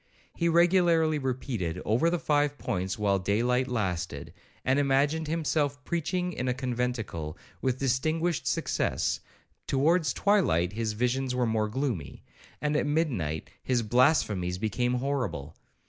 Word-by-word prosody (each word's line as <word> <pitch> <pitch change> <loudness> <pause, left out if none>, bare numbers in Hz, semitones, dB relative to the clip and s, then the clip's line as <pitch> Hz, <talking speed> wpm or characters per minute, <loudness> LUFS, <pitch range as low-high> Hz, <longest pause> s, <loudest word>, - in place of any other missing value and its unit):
He 170 -1 0
regularly 170 -2 +4
repeated 120 - -3
over 120 +10 +3
the 175 - +1
five 145 -3 +1
points 95 0 -2
while 100 -2 +2
day 100 +4 0
light 125 +1 +1
lasted, 95 - -3 0.3
and 130 +2 +3
imagined 145 +3 +2
himself 145 -3 0
preaching 180 +3 -1
in 130 -3 -3
a 125 - +1
conventicle 120 - -3 0.2
with 130 -1 0
distinguished 155 +5 0
success; - - 0 0.5
towards 155 +2 +2
twilight 125 - +2
his 110 0 -2
visions 125 +3 0
were 125 -1 +2
more 110 -1 +1
gloomy, 115 - -3 0.4
and 150 0 0
at 150 - +1
midnight 120 - -1
his 125 -2 0
blasphemies 105 - +2
became 120 +4 0
horrible. 125 - -2
130 Hz, 130 wpm, -28 LUFS, 110-150 Hz, 0.5 s, regularly